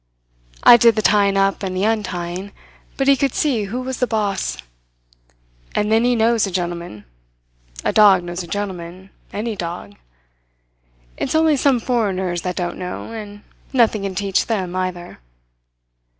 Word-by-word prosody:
I 240 - +9
did 230 -2 +5
the 215 - -1
tying 200 -1 +3
up 195 0 +1
and 185 -2 -3
the 190 - 0
untying, 190 -3 -2 0.4
but 270 - 0
he 275 - +6
could 270 -1 -1
see 245 -9 +1
who 245 +6 -4
was 260 0 -4
the 250 - +1
boss. 205 - -1 1.2
And 210 +1 0
then 225 +1 +4
he 245 0 +3
knows 225 -1 +2
a - - -3
gentleman. 175 - -4 0.8
A - - +1
dog 200 -4 +6
knows 175 +1 -5
a 175 - -8
gentleman 185 -1 -6 0.2
any 220 +2 -3
dog. 170 - -6 1.2
It's - - -2
only 315 -1 +4
some 270 -2 +2
foreigners 190 -8 -1
that 180 0 -3
don't 175 -1 -3
know; 180 +4 -6
and 205 -2 -8 0.3
nothing 230 -4 +3
can 195 -1 -4
teach 195 0 0
them, 185 -6 -2
either." 185 - -4
200 Hz, 155 wpm, -20 LUFS, 180-225 Hz, 1.2 s, I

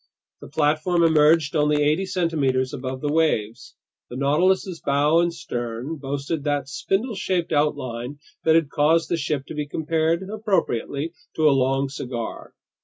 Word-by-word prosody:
The - - -11
platform 155 +4 +1
emerged 155 -1 +4
only 150 -1 +3
eighty 155 +6 +1
centimeters 145 -8 0
above 130 -1 -5
the 145 0 -1
waves. 120 -9 0 0.3
The - - -7
Nautilus's 170 +6 +1
bow 145 +3 +3
and 170 0 +2
stern 120 +1 -5
boasted 140 +2 -3
that 145 -2 -1
spindle 195 - -1
shaped 180 -3 -1
outline 140 -3 -1 0.3
that 160 0 +4
had 160 -4 +2
caused 160 +2 +2
the 170 - +1
ship 145 -3 -2
to - - -8
be 150 -1 -3
compared 160 +4 0
appropriately 180 - -1 0.2
to 155 -1 +3
a - - +6
long 135 +1 +1
cigar. 125 -4 -6
150 Hz, 150 wpm, -23 LUFS, 140-165 Hz, 0.3 s, a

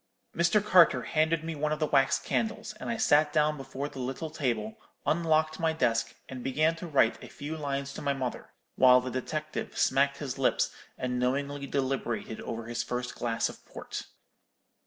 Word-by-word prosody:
Mr. 175 +5 +3
Carter 170 - +6
handed 160 +1 +1
me 165 0 -3
one 150 0 -1
of 155 - 0
the 155 - +1
wax 135 -2 +3
candles, 220 -1 -2
and - - -5
I 235 - -1
sat 150 -8 +4
down 150 0 +2
before 135 0 -5
the 135 - -9
little 135 +5 -4
table, 115 -8 -2 0.3
unlocked 155 -1 +2
my 160 -1 +2
desk, 115 -5 0
and 130 -2 -7
began 155 +5 +2
to 175 - -6
write 135 -7 +2
a - - -8
few 150 +3 -6
lines 140 -2 -3
to - - -7
my 140 -1 +1
mother; 130 -2 -4 0.3
while 125 -1 +7
the 125 0 -5
detective 150 +4 -4
smacked 140 +1 +3
his 135 -3 -5
lips 135 - +2 0.2
and 125 -1 -2
knowingly 140 +3 -1
deliberated 130 -5 -2
over 115 0 -5
his 120 0 -2
first 125 0 -3
glass 115 -1 0
of - - -10
port. - - -7
140 Hz, 180 wpm, -29 LUFS, 125-155 Hz, 0.3 s, while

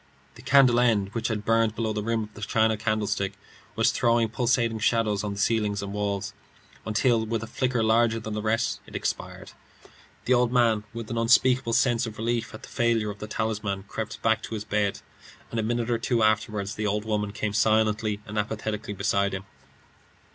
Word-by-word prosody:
The - - -14
candle 130 -3 +5
end, 110 -5 +2
which 115 +2 -2
had 105 -2 -3
burned 115 -1 +2
below 110 -2 -1
the 105 - -2
rim 115 +1 -1
of 105 0 -11
the 105 - -11
china 110 +1 +2
candlestick, 105 -2 -1 0.4
was - - +3
throwing 115 -1 +2
pulsating 115 -1 +1
shadows 110 -2 +1
on 105 -1 -2
the 100 - -7
ceiling 105 -1 +1
and 100 0 -5
walls, 100 -1 -2 0.5
until, 110 +1 +2
with 110 0 -2
a - - -3
flicker 125 0 -1
larger 115 +1 +3
than 110 -1 -6
the 105 - -2
rest, 110 +1 0
it - - -12
expired. - - -4 0.7
The 130 - +3
old 125 -1 +3
man, 115 -4 +2
with 115 -1 -7
an 115 - -1
unspeakable 125 +1 +3
sense 120 -1 +2
of 110 - -8
relief 115 +1 -1
at 110 - -11
the - - -9
failure 115 -4 +1
of 100 - -11
the 105 - -6
talisman, 105 -3 -2
crept 110 +1 -5
back 110 0 +2
to 115 - -6
his 105 - -4
bed, 105 -1 -1 0.5
and 115 - -2
a - - +2
minute 120 +1 -1
or 115 - +1
two 115 -1 +1
afterward 110 -2 +1
the 105 +1 -3
old 105 +1 -1
woman 105 -2 -1
came 105 0 -3
silently 110 0 +2
and 105 +1 -3
apathetically 105 0 -3
beside 100 0 0
him. 95 - -6
110 Hz, 200 wpm, -26 LUFS, 105-115 Hz, 0.7 s, candle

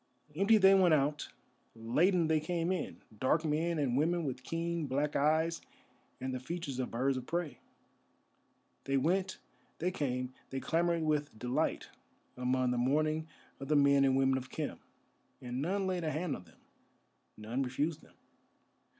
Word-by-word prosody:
Empty 200 +6 +5
they 195 -1 +7
went 185 -4 +5
out, 150 +1 0 0.5
laden 160 - +2
they 160 -1 +3
came 170 +2 -1
in, 185 -4 -4 0.2
dark 155 +5 +2
men 160 +2 0
and 135 -5 0
women 165 +4 +1
with 130 -2 -4
keen 165 +2 -2
black 145 +3 -1
eyes 160 +3 +2 0.6
and 130 0 -3
the 130 - -3
features 140 -1 -5
of 125 - -2
birds 130 +3 0
of 125 - -6
prey. 170 -7 -3 1.3
They 135 0 +1
went, 185 +7 +1 0.4
they 180 +3 -1
came, 125 -6 -2 0.2
they 135 - -3
clamoured 170 +2 +1
with 150 -6 -1
delight 125 +3 -1 0.5
among 125 0 +1
the 125 - 0
mourning 155 +5 +1 0.3
of 135 - -6
the 150 - +2
men 140 -1 +5
and 135 -1 +3
women 135 0 +3
of 130 - -11
Khem, - - -4 0.6
and 125 +1 -4
none 190 +5 0
laid 185 -2 -1
a 155 - 0
hand 155 0 -2
on 90 - -11
them, 80 - -21 0.8
none 115 +5 -3
refused 145 +5 -1
them. - - -21
150 Hz, 160 wpm, -33 LUFS, 130-170 Hz, 1.3 s, they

